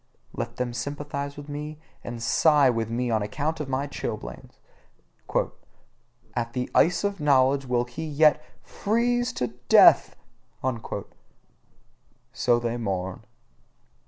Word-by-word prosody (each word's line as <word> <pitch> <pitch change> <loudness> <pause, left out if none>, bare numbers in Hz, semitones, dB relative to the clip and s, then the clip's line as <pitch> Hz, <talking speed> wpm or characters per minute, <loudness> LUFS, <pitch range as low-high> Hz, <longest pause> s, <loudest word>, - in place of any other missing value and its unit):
Let 115 0 -4
them 125 -1 -3
sympathise 140 +2 -4
with 145 0 -9
me 150 +1 -6 0.3
and 120 -1 -6
sigh 145 +1 +4
with 115 -2 -2
me 120 +1 -1
on 110 -1 +1
account 150 +10 -2
of 150 -3 -4
my 135 +1 -1
chilblains: 115 -6 -6 1.8
"At 120 0 -2
the 125 -1 -3
ice 175 +3 +3
of 200 -1 -1
knowledge 140 -2 +3
will 120 -1 +1
he 125 +6 -7
yet 150 0 +4 0.2
FREEZE 240 +3 0
TO 125 - -1 0.2
DEATH!" - - +7 2.2
so 120 -2 +2
they 120 0 -2
mourn. 95 -2 -3
135 Hz, 120 wpm, -26 LUFS, 120-150 Hz, 2.2 s, DEATH